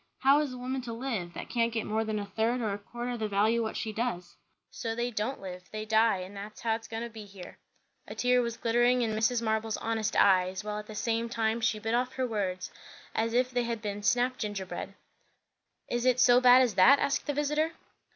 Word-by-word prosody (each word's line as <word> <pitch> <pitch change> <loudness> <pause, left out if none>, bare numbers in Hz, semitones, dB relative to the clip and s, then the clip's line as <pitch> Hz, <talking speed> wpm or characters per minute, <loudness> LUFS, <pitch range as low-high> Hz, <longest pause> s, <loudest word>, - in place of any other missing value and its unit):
How 275 +2 +5
is 295 -3 -1
a 255 - -7
woman 255 +1 -3
to 235 -2 -6
live, 225 -8 -4
that - - -6
can't 235 -1 +1
get 225 -1 -2
more 220 +1 0
than 215 -1 -2
a 205 - -3
third 225 +5 0
or 215 -4 -1
a 200 - -5
quarter 240 +4 -5
the 215 - -1
value 210 +3 +2
o' - - +1
what 220 - -3
she 220 - -3
does? 210 -6 -3 0.4
So 225 -1 -4
they 240 +1 -1
don't 225 +5 -2
live; 180 -1 -9
they 215 0 -5
die; 220 -1 +3
and 185 +2 -9
that's 205 +2 -8
how 225 -1 +1
it's 225 +1 -5
goin' 225 0 -4
to 235 - -5
be 220 -1 -9
here." 195 -3 -12 0.5
A - - -7
tear 250 0 +3
was 235 -1 -3
glittering 240 +2 +2
in 225 - 0
Mrs. 225 +2 +1
Marble's 220 0 0
honest 220 -1 -2
eyes, 185 0 +3
while 210 0 -3
at 210 - -9
the 215 - -9
same 230 +1 -1
time 225 0 0
she 220 -1 +1
bit 225 +1 -3
off 250 +2 0
her 260 -1 -1
words 190 -5 -3 0.4
as 225 +1 -1
if 255 +1 +2
they 245 -1 +1
had 230 -1 -2
been 205 -1 -4
snap 245 +5 +1
gingerbread. 195 -2 -5 0.9
"Is 240 0 -1
it 255 -1 +3
so 250 0 +6
bad 250 +1 +8
as 240 -4 0
that?" 195 +10 +7
asked 280 +2 -1
the 290 - 0
visiter. 300 +3 0
225 Hz, 235 wpm, -29 LUFS, 210-245 Hz, 0.9 s, bad